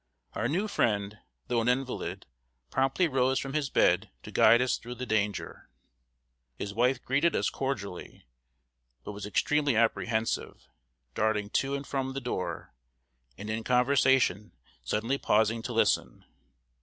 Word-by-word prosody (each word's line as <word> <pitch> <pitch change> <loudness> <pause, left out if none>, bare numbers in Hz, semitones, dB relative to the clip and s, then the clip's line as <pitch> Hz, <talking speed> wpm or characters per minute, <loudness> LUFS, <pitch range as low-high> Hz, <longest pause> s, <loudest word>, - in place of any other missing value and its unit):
Our 115 - -1
new 185 +11 0
friend, 105 - 0 0.3
though 120 -2 0
an 115 - -2
invalid, 125 +1 -2 0.5
promptly 135 +7 +2
rose 130 -2 +1
from 135 0 -3
his 150 -2 -1
bed - - +2
to - - -9
guide 120 - +6
us 125 0 +1
through 120 +1 -8
the 125 +1 -5
danger. 105 -3 -2 0.9
His 100 +10 -5
wife 125 +3 +2
greeted 140 +6 +1
us - - +1
cordially, 100 -10 -5 0.8
but - - -6
was 100 0 -7
extremely 145 +4 +1
apprehensive 110 0 -1 0.5
darting 105 - 0
to 140 +1 0
and 140 0 -5
from 135 -1 -3
the 135 - -3
door, 90 - -4 0.6
and 100 - -7
in 110 +1 -3
conversation 125 -5 +2 0.3
suddenly 115 - -1
pausing 110 +2 +2
to - - -5
listen. - - +1
120 Hz, 140 wpm, -29 LUFS, 105-135 Hz, 0.9 s, guide